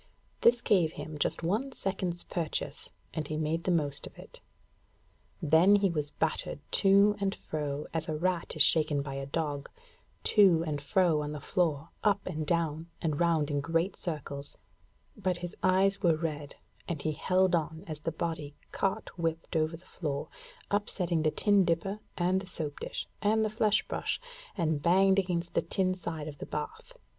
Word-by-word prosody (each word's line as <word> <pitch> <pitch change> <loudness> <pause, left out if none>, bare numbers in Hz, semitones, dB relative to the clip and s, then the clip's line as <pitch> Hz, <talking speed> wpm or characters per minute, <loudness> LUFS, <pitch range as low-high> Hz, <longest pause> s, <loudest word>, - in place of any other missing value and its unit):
This 240 0 +5
gave 170 -6 +3
him 155 -1 -7
just 165 - 0
one 215 +11 0
second's 185 -4 -2
purchase, 155 -3 -3 0.2
and 155 -3 -3
he 155 - -3
made 160 +2 -1
the - - +1
most 145 -5 0
of - - -15
it. - - -12 1.0
Then 165 +6 +6
he 200 -2 +3
was 150 -3 -2
battered 160 -1 -1
to 200 +1 +5
and 195 -1 0
fro 150 -1 -4
as 160 0 -2
a 155 - -1
rat 175 +2 -1
is - - +6
shaken 150 -3 +3
by 135 -1 -5
a 135 0 -4
dog 145 -1 -2 0.5
to 185 -6 +5
and 150 -3 -2
fro 165 0 +2
on 150 0 -4
the 150 - -5
floor, 160 -2 0
up 205 -1 +2
and 155 -1 -3
down, 165 -1 0
and 155 -3 -1
round 165 -4 +2
in 145 -1 0
great 165 +5 0
circles; 145 -4 -5 0.7
at 180 -1 +1
his 175 0 -6
eyes 190 +1 +3
were 170 -4 +4
red, 150 -3 -4 0.3
and 160 -4 -3
he 155 - +1
held 185 +4 +2
on 160 0 -1
as 155 -5 -6
the 165 - -2
body 160 -3 -4 0.2
cart 195 - -2
whipped 165 +1 -2
over 160 +1 +1
the 180 - -17
floor, 145 -7 -4 0.4
upsetting 185 -5 0
the 155 - +3
tin 205 +4 +3
dipper 180 +4 0 0.2
and 180 +1 +2
the 195 - -6
soap 155 -5 -1
dish - - -5
and 220 +1 +3
the 215 - -1
flesh 215 -1 +2
brush, - - -2 0.4
and 160 -4 +1
banged 190 +3 +5
against 175 -2 -2
the - - +2
tin 185 -2 0
side 165 -4 -5
of 145 -2 -8
the - - -6
bath. 485 - -6
165 Hz, 180 wpm, -30 LUFS, 150-185 Hz, 1.0 s, Then